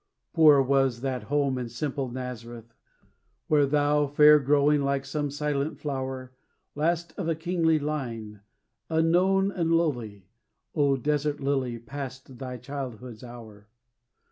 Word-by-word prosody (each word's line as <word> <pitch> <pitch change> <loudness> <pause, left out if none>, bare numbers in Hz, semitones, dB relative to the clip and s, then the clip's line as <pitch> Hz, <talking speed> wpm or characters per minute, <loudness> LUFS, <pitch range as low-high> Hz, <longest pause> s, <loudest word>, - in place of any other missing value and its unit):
Poor 150 -4 +6
was 135 -3 +1
that 130 -2 -3
home 140 -2 0
in 120 -2 -4
simple 135 +2 -3
Nazareth, 120 -2 -7 0.7
Where 145 -2 +4
thou, 145 +1 +2
fair 150 +1 +7
growing, 145 +1 +3
like 140 0 -1
some 145 +1 -2
silent 145 +1 -2
flower, 130 -3 -5 0.4
Last 165 +2 -1
of 165 - -2
a 165 - +1
kingly 165 -1 +1
line, 120 -9 -4 0.5
unknown 180 +5 +3
and 170 -4 -1
lowly, 120 - -1 0.5
O 140 -3 +2
desert 150 +2 -1
lily, 135 -3 -1
passed 130 +1 -8
thy 125 -1 -5
childhood's 125 -4 -7
hour. 110 -4 -12
140 Hz, 125 wpm, -27 LUFS, 125-150 Hz, 0.7 s, fair